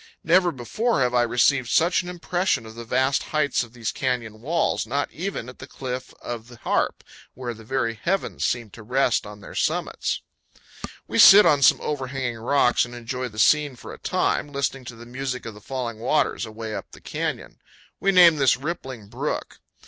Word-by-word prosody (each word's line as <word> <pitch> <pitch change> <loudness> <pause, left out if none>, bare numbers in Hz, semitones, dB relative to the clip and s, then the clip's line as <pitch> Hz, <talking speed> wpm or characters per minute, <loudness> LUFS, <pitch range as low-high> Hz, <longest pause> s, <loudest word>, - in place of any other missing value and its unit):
Never 175 +1 +4
before 160 - -1
have 125 -1 +1
I 120 - +4
received 120 +2 +2
such 170 +3 +3
an 180 - -8
impression 175 - -1
of 110 - -10
the 115 +1 -8
vast 130 +4 +1
heights 150 -3 0
of 120 -1 -13
these 115 -3 -3
canyon 115 -4 -3
walls, 165 +6 0
not 145 +1 -1
even 180 - -4
at 125 - -11
the - - -9
Cliff 130 -1 -6
of 115 -1 -6
the 120 - -13
Harp, - - -1 0.3
where 120 -1 -5
the 110 0 -13
very 115 -1 -1
heavens 185 - -2
seemed 120 -4 -1
to 115 - -11
rest 125 0 +1
on 105 0 -11
their - - -11
summits. - - -1 0.8
We - - -1
sit 210 +2 +10
on 145 -2 +4
some 130 - +6
overhanging 130 -4 -3
rocks 125 +1 +3
and 120 0 -7
enjoy 125 +2 -4
the 110 -3 -13
scene 145 +3 +3
for - - -10
a - - -11
time, 145 - 0
listening 140 -2 -2
to 120 - -8
the 115 +1 -12
music 125 +1 -4
of 115 - -6
the 105 - -14
falling 120 -1 -4
waters 120 -1 0
away 110 0 -6
up - - -5
the - - -12
canyon. - - -4 0.4
We 195 - +2
name 175 -4 +7
this 135 -2 +4
Rippling 130 -7 -6
Brook. - - -4
125 Hz, 195 wpm, -24 LUFS, 115-145 Hz, 0.8 s, sit